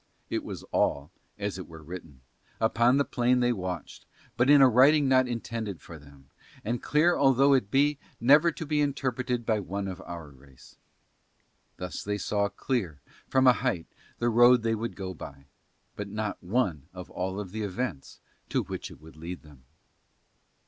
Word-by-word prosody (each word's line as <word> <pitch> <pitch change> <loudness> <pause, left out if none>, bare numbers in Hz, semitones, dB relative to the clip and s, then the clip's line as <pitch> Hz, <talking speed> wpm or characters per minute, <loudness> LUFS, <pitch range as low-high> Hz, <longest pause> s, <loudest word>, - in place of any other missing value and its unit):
It - - -1
was - - -7
all, 70 +4 0 0.3
as 100 -2 -3
it 90 - -8
were 80 -1 -12
written, 80 -5 -10 0.4
upon 120 +3 +3
the 140 - +2
plain 125 +1 +2
they 120 0 +2
watched, 90 -5 -6 0.3
but 125 +3 +2
in 145 0 +8
a 135 - +8
writing 135 +4 +5
not 130 -1 +4
intended 115 -5 -4
for 80 +2 -11
them, 70 -1 -18 0.3
and, 120 +3 -2
clear 160 +4 +3
although 135 +1 +4
it 125 -7 +2
be, 145 +4 +2 0.2
never 150 +7 +5
to 160 - -7
be 150 0 +1
interpreted 130 -4 -1
by 110 -2 +1
one 100 0 -4
of 95 0 -6
our 85 -5 -8
race. 65 -1 -18 1.0
Thus 90 0 -5
they 105 0 -2
saw 100 +1 0
clear, 100 - -3 0.3
from 130 0 +3
a 125 - +8
height, 120 -10 -2 0.3
the 120 - +1
road 120 +1 +6
they 115 0 +1
would 115 +1 -3
go 95 -2 -5
by, 70 -4 -10 0.5
but 105 - -5
not 105 0 -4
one 90 - -1
of 90 -1 -9
all 95 +3 -3
the 105 +3 -6
events 100 - -4 0.3
to - - 0
which - - -6
it - - -14
would 80 0 -15
lead 85 +3 -8
them. 70 -5 -18
105 Hz, 175 wpm, -28 LUFS, 90-125 Hz, 1.0 s, in